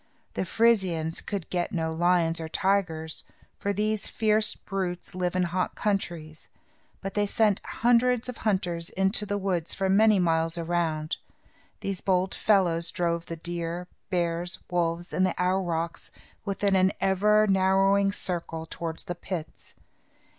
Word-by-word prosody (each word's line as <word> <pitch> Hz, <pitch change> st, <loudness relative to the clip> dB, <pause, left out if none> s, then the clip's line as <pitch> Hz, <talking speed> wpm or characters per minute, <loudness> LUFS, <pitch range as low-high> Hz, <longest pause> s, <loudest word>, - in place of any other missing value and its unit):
The -, -, -2 dB
Frisians 185 Hz, -8 st, +2 dB
could 200 Hz, -5 st, -4 dB
get 175 Hz, +2 st, -1 dB
no 160 Hz, -4 st, -1 dB
lions 170 Hz, -1 st, +2 dB
or 160 Hz, -, -5 dB
tigers, 180 Hz, -4 st, 0 dB, 0.4 s
for 200 Hz, -, -1 dB
these 210 Hz, +1 st, -1 dB
fierce 215 Hz, -1 st, +2 dB
brutes 185 Hz, -2 st, -4 dB
live 180 Hz, -1 st, -1 dB
in 185 Hz, -, +2 dB
hot 180 Hz, +1 st, -1 dB
countries; 170 Hz, -6 st, -3 dB, 0.5 s
but 195 Hz, -1 st, -5 dB
they 205 Hz, 0 st, +1 dB
sent 210 Hz, -1 st, +2 dB
hundreds 245 Hz, 0 st, +2 dB
of 250 Hz, -2 st, -6 dB
hunters 180 Hz, -5 st, -1 dB
into 195 Hz, +2 st, 0 dB
the 205 Hz, 0 st, -1 dB
woods 185 Hz, -4 st, -1 dB
for 195 Hz, -1 st, 0 dB
many 215 Hz, +2 st, +5 dB
miles 165 Hz, -1 st, +1 dB
around. 165 Hz, -2 st, -1 dB, 0.6 s
These 195 Hz, -2 st, -3 dB
bold 185 Hz, 0 st, +1 dB
fellows 175 Hz, -5 st, +2 dB
drove 170 Hz, -1 st, -1 dB
the 165 Hz, -, -4 dB
deer, 170 Hz, +1 st, -4 dB, 0.2 s
bears, 175 Hz, -1 st, 0 dB
wolves, 170 Hz, 0 st, -1 dB
and 185 Hz, -, +2 dB
the 185 Hz, -, 0 dB
aurochs 175 Hz, -3 st, -1 dB, 0.4 s
within 200 Hz, 0 st, +1 dB
an 190 Hz, 0 st, +4 dB
ever 210 Hz, +3 st, +4 dB
narrowing 195 Hz, 0 st, +3 dB
circle 170 Hz, -4 st, -3 dB
towards 165 Hz, -1 st, -5 dB
the 175 Hz, -, -4 dB
pits. 175 Hz, -2 st, -7 dB
180 Hz, 140 wpm, -27 LUFS, 170-200 Hz, 0.6 s, many